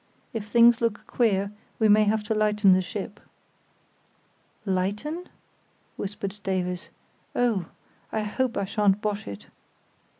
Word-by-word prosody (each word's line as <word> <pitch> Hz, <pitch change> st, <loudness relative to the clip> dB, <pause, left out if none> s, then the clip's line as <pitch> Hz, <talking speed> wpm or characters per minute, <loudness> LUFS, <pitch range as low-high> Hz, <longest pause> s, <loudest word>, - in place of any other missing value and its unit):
If 220 Hz, -2 st, -4 dB
things 235 Hz, +2 st, +6 dB
look 230 Hz, -3 st, -1 dB
queer 200 Hz, -4 st, +1 dB, 0.3 s
we 220 Hz, -, +3 dB
may 210 Hz, 0 st, +6 dB
have 215 Hz, +1 st, +1 dB
to 210 Hz, -, -1 dB
lighten 210 Hz, -2 st, +4 dB
the 185 Hz, -, +4 dB
ship." 205 Hz, +1 st, -6 dB, 1.5 s
"Lighten?" 210 Hz, -, -2 dB, 0.7 s
whispered 200 Hz, 0 st, -5 dB
Davies; 180 Hz, -2 st, -2 dB, 0.5 s
"oh, 220 Hz, -8 st, +1 dB, 0.4 s
I 220 Hz, -, 0 dB
hope 245 Hz, +4 st, -1 dB
I 200 Hz, -, 0 dB
shan't 205 Hz, -1 st, +2 dB
bosh 210 Hz, 0 st, -3 dB
it." 100 Hz, 0 st, -7 dB
210 Hz, 125 wpm, -26 LUFS, 195-220 Hz, 1.5 s, things